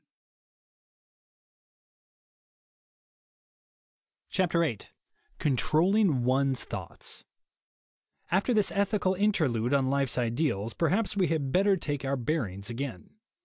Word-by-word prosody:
VIII 170 Hz, -, +1 dB, 0.6 s
CONTROLLING 155 Hz, -, +2 dB
ONE'S 130 Hz, +1 st, +1 dB
THOUGHTS 95 Hz, -7 st, -6 dB, 1.1 s
AFTER 190 Hz, +7 st, +2 dB
this 210 Hz, -2 st, +2 dB
ethical 200 Hz, -1 st, +1 dB
interlude 145 Hz, -, +1 dB
on 135 Hz, -1 st, +1 dB
life's 140 Hz, -2 st, 0 dB
ideals, 115 Hz, -3 st, 0 dB
perhaps 195 Hz, +6 st, 0 dB
we 190 Hz, -3 st, +2 dB
had 150 Hz, -4 st, -1 dB
better 195 Hz, +4 st, +3 dB
take 145 Hz, -5 st, -3 dB
our 135 Hz, 0 st, -1 dB
bearings 115 Hz, -, -3 dB
again. 120 Hz, -5 st, -6 dB
140 Hz, 85 wpm, -28 LUFS, 125-185 Hz, 1.1 s, better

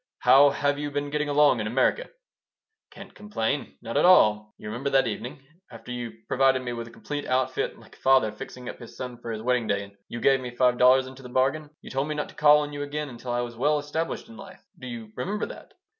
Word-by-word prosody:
How 135 Hz, +3 st, +7 dB
have 145 Hz, 0 st, 0 dB
you 145 Hz, 0 st, -3 dB
been 145 Hz, 0 st, -3 dB
getting 150 Hz, 0 st, -1 dB
along 145 Hz, -3 st, +4 dB
in 110 Hz, -, -2 dB
America?" 130 Hz, -, +1 dB, 0.8 s
"Can't -, -, -12 dB
complain. 130 Hz, -, -3 dB
Not 115 Hz, +4 st, -3 dB
at 145 Hz, -, +3 dB
all. 105 Hz, -12 st, +5 dB
You -, -, -10 dB
remember 120 Hz, +6 st, -3 dB
that 135 Hz, -1 st, +3 dB
evening? 125 Hz, +5 st, -5 dB, 0.3 s
After -, -, -10 dB
you 115 Hz, -2 st, -6 dB
provided 135 Hz, -1 st, +3 dB
me 120 Hz, -1 st, -4 dB
with 115 Hz, -1 st, -6 dB
a -, -, -12 dB
complete 145 Hz, +4 st, -6 dB
outfit, 130 Hz, 0 st, 0 dB
like -, -, -17 dB
a -, -, -23 dB
father 130 Hz, -5 st, +4 dB
fixing 125 Hz, +3 st, -9 dB
up -, -, -7 dB
his 120 Hz, -1 st, -12 dB
son 125 Hz, -2 st, -6 dB
for 120 Hz, -, -7 dB
his 110 Hz, -1 st, -4 dB
wedding 125 Hz, -2 st, +1 dB
day, 100 Hz, 0 st, 0 dB
and 100 Hz, 0 st, -13 dB
you 120 Hz, -, -6 dB
gave 135 Hz, +2 st, +4 dB
me 125 Hz, -1 st, -7 dB
five 125 Hz, -1 st, +3 dB
dollars 130 Hz, +1 st, +6 dB
into 130 Hz, +1 st, -11 dB
the 125 Hz, -, -10 dB
bargain, 135 Hz, +4 st, 0 dB
you -, -, -10 dB
told 135 Hz, +2 st, -1 dB
me 155 Hz, -, -3 dB
not 150 Hz, -, -3 dB
to -, -, -15 dB
call 150 Hz, 0 st, +6 dB
on 145 Hz, 0 st, -5 dB
you 145 Hz, -, -5 dB
again 145 Hz, +1 st, -4 dB
until 120 Hz, 0 st, -7 dB
I 120 Hz, 0 st, 0 dB
was 120 Hz, -1 st, -6 dB
well 150 Hz, +6 st, +2 dB
established 160 Hz, +7 st, -3 dB
in 230 Hz, -, -13 dB
life. 195 Hz, -1 st, -13 dB
Do 130 Hz, -, -8 dB
you 115 Hz, -3 st, -7 dB
remember 200 Hz, -, -2 dB
that?" -, -, -11 dB
130 Hz, 245 wpm, -26 LUFS, 120-145 Hz, 0.8 s, How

